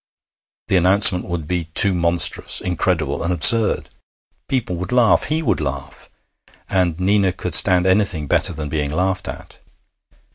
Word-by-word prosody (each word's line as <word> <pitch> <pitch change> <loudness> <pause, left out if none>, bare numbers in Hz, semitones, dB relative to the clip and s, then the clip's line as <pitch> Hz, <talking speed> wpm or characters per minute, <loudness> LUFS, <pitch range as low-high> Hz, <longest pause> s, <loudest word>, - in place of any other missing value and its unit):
The 95 - 0
announcement 95 +1 +5
would 85 -4 -7
be 90 -1 -4
too 95 +5 +5
monstrous, 85 -1 +1
incredible, 80 -5 -4
and 85 - -4
absurd. 105 +6 +2 0.5
People 125 -9 -4
would 90 +5 -8
laugh. 125 -2 +1
He 160 +1 -3
would - - -2
laugh. 70 -2 -8 0.6
And 90 -3 -2
Nina 95 0 0
could 90 -1 -7
stand 90 +1 +4
anything 95 -5 -1
better - - +1
than 75 -2 -8
being 75 -1 -4
laughed 90 +5 -3
at. - - -11
90 Hz, 145 wpm, -17 LUFS, 80-95 Hz, 0.6 s, announcement